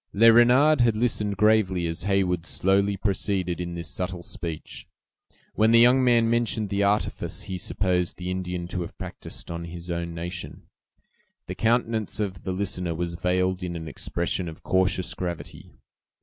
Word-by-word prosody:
Le 115 Hz, +3 st, +7 dB
Renard 125 Hz, +5 st, +5 dB
had 115 Hz, -2 st, +3 dB
listened 105 Hz, -3 st, 0 dB
gravely 105 Hz, -4 st, +3 dB
as 80 Hz, +1 st, -3 dB
Heyward 95 Hz, -4 st, +1 dB
slowly 100 Hz, +1 st, +1 dB
proceeded 95 Hz, -3 st, -1 dB
in 85 Hz, 0 st, -4 dB
this 85 Hz, -2 st, -5 dB
subtle 90 Hz, +2 st, -4 dB
speech. 80 Hz, -2 st, -6 dB, 0.7 s
When 110 Hz, +1 st, +3 dB
the 115 Hz, 0 st, +6 dB
young 125 Hz, +2 st, +6 dB
man 120 Hz, -2 st, +4 dB
mentioned 115 Hz, -3 st, +1 dB
the 100 Hz, 0 st, 0 dB
artifice 100 Hz, +1 st, 0 dB
he 95 Hz, -1 st, -5 dB
supposed 90 Hz, -2 st, -1 dB
the 90 Hz, 0 st, -4 dB
Indian 90 Hz, -1 st, -3 dB
to 90 Hz, -, -3 dB
have 85 Hz, -, -7 dB
practised -, -, -7 dB
on 85 Hz, 0 st, -5 dB
his 85 Hz, +1 st, -7 dB
own 85 Hz, 0 st, -3 dB
nation, 85 Hz, +1 st, -6 dB, 0.8 s
the -, -, -5 dB
countenance 115 Hz, -2 st, 0 dB
of 95 Hz, -5 st, -3 dB
the 95 Hz, -, -1 dB
listener 90 Hz, -3 st, -2 dB
was 85 Hz, +1 st, -3 dB
veiled 90 Hz, +2 st, 0 dB
in 90 Hz, -1 st, -4 dB
an 80 Hz, -1 st, -6 dB
expression 85 Hz, +2 st, -2 dB
of 80 Hz, -, -12 dB
cautious 95 Hz, -1 st, +1 dB
gravity. 85 Hz, -2 st, -6 dB
95 Hz, 165 wpm, -25 LUFS, 85-105 Hz, 0.8 s, Le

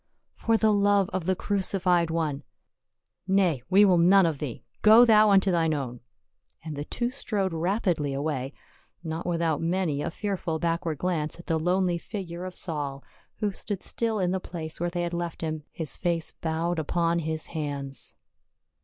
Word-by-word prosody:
"For 225 Hz, 0 st, +2 dB
the 220 Hz, -1 st, +3 dB
love 200 Hz, -1 st, +3 dB
of 185 Hz, -2 st, -2 dB
the 190 Hz, -, +2 dB
crucified 185 Hz, -3 st, +1 dB
One 160 Hz, -4 st, -1 dB, 0.3 s
— -, -, -60 dB
" -, -, -59 dB
" -, -, -59 dB
Nay, 185 Hz, -8 st, +2 dB
we 200 Hz, +2 st, +6 dB
will 180 Hz, -3 st, +4 dB
none 190 Hz, +2 st, +6 dB
of 160 Hz, -4 st, -1 dB
thee. 135 Hz, -6 st, -5 dB, 0.2 s
Go 220 Hz, +3 st, +8 dB
thou 215 Hz, -2 st, +6 dB
unto 195 Hz, -1 st, +4 dB
thine 165 Hz, -3 st, +2 dB
own." 125 Hz, -4 st, -4 dB, 0.6 s
And 155 Hz, -2 st, -5 dB
the 145 Hz, +1 st, -4 dB
two 240 Hz, +7 st, -2 dB
strode 205 Hz, -9 st, -2 dB
rapidly 175 Hz, -3 st, 0 dB
away, 135 Hz, -1 st, -2 dB, 0.5 s
not 160 Hz, +1 st, -4 dB
without 165 Hz, -3 st, 0 dB
many 165 Hz, -4 st, 0 dB
a -, -, -2 dB
fearful 180 Hz, -3 st, -3 dB
backward 165 Hz, -1 st, -1 dB
glance 165 Hz, -1 st, -2 dB
at 170 Hz, -, -11 dB
the 165 Hz, -2 st, 0 dB
lonely 180 Hz, +1 st, +1 dB
figure 180 Hz, -3 st, -6 dB
of 185 Hz, -1 st, -7 dB
Saul, 145 Hz, -5 st, -4 dB, 0.4 s
who 210 Hz, -1 st, +1 dB
stood 195 Hz, 0 st, -5 dB
still 225 Hz, -2 st, -1 dB
in 180 Hz, -3 st, +1 dB
the 190 Hz, -, 0 dB
place 165 Hz, -3 st, -6 dB
where 175 Hz, +1 st, 0 dB
they 175 Hz, 0 st, -2 dB
had 175 Hz, 0 st, -3 dB
left 170 Hz, -1 st, -4 dB
him, 155 Hz, -2 st, -3 dB
his 160 Hz, -3 st, -6 dB
face 170 Hz, -2 st, 0 dB
bowed 165 Hz, +1 st, -2 dB
upon 170 Hz, +2 st, +1 dB
his 160 Hz, -1 st, -3 dB
hands. 140 Hz, -3 st, -4 dB
170 Hz, 180 wpm, -27 LUFS, 160-190 Hz, 0.6 s, Go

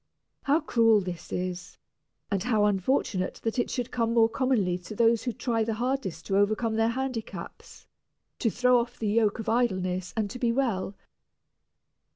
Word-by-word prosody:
How 290 Hz, +4 st, +2 dB
cruel 225 Hz, -6 st, +4 dB
this 180 Hz, -3 st, -7 dB
is, 180 Hz, 0 st, -4 dB, 0.5 s
and 195 Hz, -2 st, 0 dB
how 220 Hz, -2 st, +2 dB
unfortunate 195 Hz, -1 st, 0 dB
that 225 Hz, +2 st, -1 dB
it -, -, 0 dB
should 245 Hz, -1 st, -3 dB
come 230 Hz, -1 st, 0 dB
more 225 Hz, -1 st, +6 dB
commonly 225 Hz, -8 st, +1 dB
to 180 Hz, +4 st, -9 dB
those 230 Hz, 0 st, +3 dB
who 245 Hz, -, -2 dB
try 230 Hz, -1 st, -1 dB
the 220 Hz, 0 st, -2 dB
hardest 235 Hz, -9 st, -2 dB
to 195 Hz, -, 0 dB
overcome 215 Hz, +3 st, +1 dB
their 225 Hz, +1 st, +2 dB
handicaps, 255 Hz, -2 st, -6 dB, 0.5 s
to 230 Hz, -, +2 dB
throw 250 Hz, +2 st, +3 dB
off 240 Hz, +1 st, -4 dB
the 215 Hz, -, -2 dB
yoke 215 Hz, 0 st, +2 dB
of 225 Hz, -, -6 dB
idleness 185 Hz, -6 st, 0 dB
and 215 Hz, -2 st, +1 dB
to 250 Hz, -, -7 dB
be 240 Hz, -1 st, +2 dB
well. 230 Hz, -7 st, -1 dB
225 Hz, 170 wpm, -27 LUFS, 195-245 Hz, 0.5 s, more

